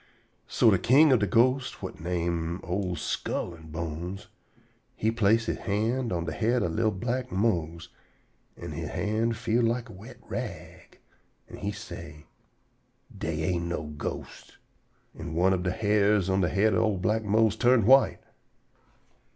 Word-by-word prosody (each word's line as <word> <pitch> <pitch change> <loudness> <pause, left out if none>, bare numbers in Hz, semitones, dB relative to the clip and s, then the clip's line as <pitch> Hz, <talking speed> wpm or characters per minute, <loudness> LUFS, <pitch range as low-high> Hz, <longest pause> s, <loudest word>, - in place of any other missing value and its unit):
So 110 - +4
de 95 - +3
king 135 - +5
ob 125 - +4
de 105 - +1
ghosts, 125 +6 +2
whut - - -8
name 85 0 -2
old 90 -1 -2
Skull 85 +2 -3
an' 80 -1 -13
Bones, 85 +4 -5 0.7
he 110 - 0
place 115 0 +2
he - - 0
hand 115 +4 -1
on 85 -2 -2
de 80 - -3
head 120 +5 +1
ob 85 - -1
li'l 110 0 +2
black 120 +5 -3
Mose, 85 -6 -1 0.7
an' - - -7
he - - -5
hand 110 +2 -1
feel 115 +1 +1
like 120 +1 0
a - - -10
wet 105 +7 -12
rag, - - -7 0.5
an' - - -10
he 100 0 -3
say: 85 -7 -9 0.9
"Dey 80 -1 -3
ain't 85 0 -1
no 80 -3 -4
ghosts." 75 - -7 0.6
An' 80 - -7
one 95 +3 +3
ob 90 - -1
de 90 0 -1
hairs 105 -1 +2
whut - - +2
on 95 - +2
de 85 - +2
head 105 +2 +2
ob 95 - +2
li'l 110 -3 +1
black 110 +4 0
Mose 110 +1 +2
turn 120 -2 +3
white. 135 +4 +5
100 Hz, 165 wpm, -27 LUFS, 85-115 Hz, 0.9 s, king